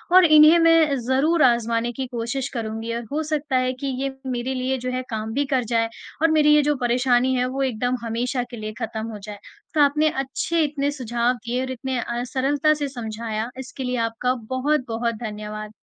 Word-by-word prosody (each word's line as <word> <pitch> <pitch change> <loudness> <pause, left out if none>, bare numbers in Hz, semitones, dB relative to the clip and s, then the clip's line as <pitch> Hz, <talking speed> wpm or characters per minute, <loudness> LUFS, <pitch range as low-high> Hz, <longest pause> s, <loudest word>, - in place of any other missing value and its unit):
और 370 -1 +9
इन्हें 310 +1 +8
मैं 330 -3 +5
ज़रूर 275 +7 +2
आज़माने 235 -1 +2
की 260 +2 -4
कोशिश 245 +3 -3
करूँगी। 225 -1 -4
अ, 235 +1 -2
हो 300 +2 0
सकता 300 -3 -2
है 255 0 +2
कि 260 +2 -5
ये 275 0 -2
मेरे 255 0 -2
लिए 260 +1 -1
जो 255 0 -4
है 255 0 -2
काम 220 0 -4
भी 285 +3 +1
कर 255 -2 +2
जाए 230 0 +2 0.3
और 325 0 +4
मेरी 300 -1 +5
ये 300 - +6
जो 295 +1 +2
परेशानी 250 0 +2
है 250 0 +1
वो 260 +2 -3
एकदम 250 0 -1
हमेशा 245 +3 -1
के 240 - -8
लिए 215 0 -5
ख़त्म 220 -1 -4
हो 210 - -7
जाए। 205 +1 -8 0.4
तो 305 - +3
आपने 300 +2 +4
अच्छे 295 +5 -1
इतने 290 -1 -1
सुझाव 240 -3 0
दिए 245 +2 -1
और 260 0 -3
इतने 260 0 -3
अ, 240 0 -3
सरलता 275 +4 +1
से 295 -1 -2
समझाया 225 -2 -4
इसके 265 +1 -7
लिए 250 0 -1
आपका 250 +3 -1 0.2
बहुत-बहुत 255 -4 0
धन्यवाद। 215 -1 -6
255 Hz, 200 wpm, -23 LUFS, 235-280 Hz, 0.4 s, और